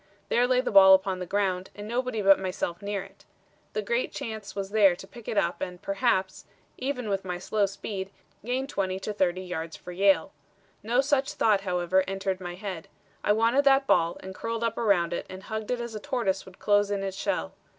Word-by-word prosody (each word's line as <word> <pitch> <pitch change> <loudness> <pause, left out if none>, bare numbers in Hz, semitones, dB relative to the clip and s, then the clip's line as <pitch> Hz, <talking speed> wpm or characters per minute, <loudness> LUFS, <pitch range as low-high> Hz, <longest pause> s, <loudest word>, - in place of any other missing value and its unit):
There 245 +1 +3
lay 255 0 +3
the 255 - -3
ball 190 -1 +9
on 190 -2 -2
the 180 - -5
ground, 190 -1 0
and 205 0 -7
nobody 240 -2 -1
but 195 0 +6
myself 185 -2 -3
near 200 -1 -3
it. - - -17 0.5
The 435 - -2
great 475 +1 -1
chance 220 -7 -6
was 195 -1 -4
there 200 -4 +5
to 185 - -11
pick 235 0 -13
it 215 - -2
up - - +1
and 180 -2 -4
perhaps, 195 -1 0 0.3
even 255 -3 -2
with 195 -1 -1
my 180 -1 -3
slow 200 +3 0
speed, 195 0 -5 0.3
gain 250 +3 -1
20 190 -8 -2
to 210 - -4
30 185 -2 +1
yards 165 -3 -5
for 180 - -10
Yale. 190 -2 +3 0.5
No 235 +5 +2
such 275 0 +1
thought, 210 -3 +3
however, 180 0 +1
entered 195 -1 -2
my 175 -1 -5
head. 185 -4 -6 0.4
I 205 - +4
wanted 230 +6 +3
that 270 0 +5
ball 170 -7 +2
and 190 - -8
curled 230 +3 -3
up 230 -1 -1
around 190 -7 +2
it - - -4
and 185 +1 -9
hugged 220 -1 -5
it 250 -1 0
as 235 -1 -5
a 215 - -5
tortoise 200 -6 -1
would 185 - -14
close 205 0 +2
in 200 -1 -1
its 195 -1 -3
shell. 80 - -2
200 Hz, 215 wpm, -27 LUFS, 185-225 Hz, 0.5 s, ball